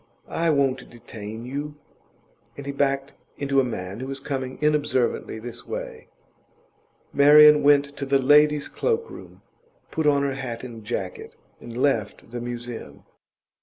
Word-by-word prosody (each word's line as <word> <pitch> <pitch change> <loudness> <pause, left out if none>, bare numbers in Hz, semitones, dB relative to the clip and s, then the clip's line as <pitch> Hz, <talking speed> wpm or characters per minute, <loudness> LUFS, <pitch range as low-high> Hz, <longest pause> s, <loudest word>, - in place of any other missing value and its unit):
I 165 0 0
won't 135 -4 +1
detain 110 -1 -9
you.' 145 +3 -5 0.8
And 140 - -8
he 140 - -3
backed 140 0 -1 0.2
into 140 -1 +1
a - - +4
man 100 -4 -5
who 130 - -5
was 135 0 -5
coming 135 -2 -4
inobservantly 150 -7 0
this 120 +1 -8
way. - - -6 1.1
Marian 150 +1 +8
went 145 0 +4
to 140 - -4
the 135 0 +4
ladies' 150 +2 +4
cloak 460 -1 -1
room, - - -12 0.5
put 160 -1 0
on 140 -1 +3
her 140 -1 0
hat 130 -3 -5
and 115 -3 -9
jacket, 100 -4 -5 0.2
and 120 0 -9
left 115 -5 -1
the 120 -1 -5
Museum. 120 -1 -7
135 Hz, 145 wpm, -24 LUFS, 120-145 Hz, 1.1 s, Marian